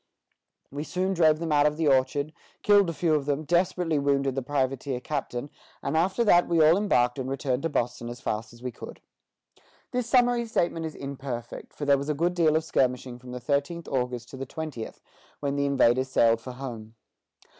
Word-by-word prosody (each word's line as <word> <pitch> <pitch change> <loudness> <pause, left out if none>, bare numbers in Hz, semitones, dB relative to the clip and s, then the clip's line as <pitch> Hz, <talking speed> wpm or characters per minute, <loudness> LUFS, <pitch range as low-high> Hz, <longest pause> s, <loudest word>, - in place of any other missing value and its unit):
We 145 +2 -4
soon 185 +3 -1
drove 160 -4 +4
them 165 0 -3
out 145 0 +5
of 150 0 -2
the 160 -1 +1
orchard, 140 +2 +2 0.3
killed 205 -3 +5
a - - -2
few 160 +1 +1
of 145 -2 0
them, 145 +1 0
desperately 170 -1 +1
wounded 140 -1 +1
the 135 - -2
privateer 135 -1 -1
captain, 140 -1 -4 0.3
and 150 - -1
after 185 +8 +2
that 175 -5 +5
we 170 -1 +2
all 155 +1 +6
embarked 130 -11 +2
and 130 0 -3
returned 135 -1 -1
to 165 - -1
Boston 120 -3 -2
as 120 0 -7
fast 110 +2 -3
as 120 +1 -16
we 125 - -3
could." - - -10 0.9
This 245 -1 -2
summary 245 -1 +3
statement 170 -6 0
is 155 - -9
imperfect, 135 -4 -6
for 145 - -5
there 140 -1 +4
was 140 +2 -4
a 150 - +1
good 170 +4 +1
deal 165 -3 +3
of 160 - +2
skirmishing 125 -4 -1
from 125 0 -13
the 125 0 -5
thirteenth 145 +6 -1
August 125 -2 -2
to 135 - -9
the 135 0 -5
twentieth, 150 -7 -6 0.4
when 140 -1 -2
the 140 0 +1
invaders 130 -1 +3
sailed 115 -2 +3
for 130 +2 -8
home. 115 -4 -8
140 Hz, 200 wpm, -27 LUFS, 125-165 Hz, 0.9 s, all